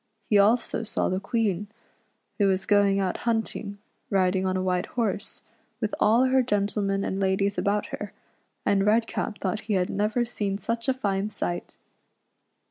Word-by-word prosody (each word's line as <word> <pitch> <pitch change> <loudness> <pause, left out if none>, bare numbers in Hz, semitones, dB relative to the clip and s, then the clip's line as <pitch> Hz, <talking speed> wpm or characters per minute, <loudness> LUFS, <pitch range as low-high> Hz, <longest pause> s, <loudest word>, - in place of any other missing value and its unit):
He 205 - +6
also 220 +3 +3
saw 225 - -1
the 185 - 0
Queen, 210 -2 -1 0.7
who 200 - +4
was 190 0 +1
going 200 -1 +4
out 190 -2 -1
hunt 225 -2 -1
ing, 205 -1 -6 0.3
riding 190 -1 +2
on 185 0 0
a 185 - -1
white 180 0 0
horse, 220 -3 -3 0.4
with 220 -3 -2
all 230 +4 +5
her 260 0 +4
gentlemen 200 -3 0
and 190 - -2
ladies 195 +1 +1
about 205 +1 +1
her, - - -5 0.5
and 195 -1 +3
Redcap 220 0 +1
thought 190 +1 -2
he - - +2
had 180 -1 0
never 215 +4 +1
seen 205 -4 -2
such 230 +4 -3
a - - +4
fine 200 -4 -1
sight. 175 -4 -4
200 Hz, 165 wpm, -26 LUFS, 195-220 Hz, 0.7 s, He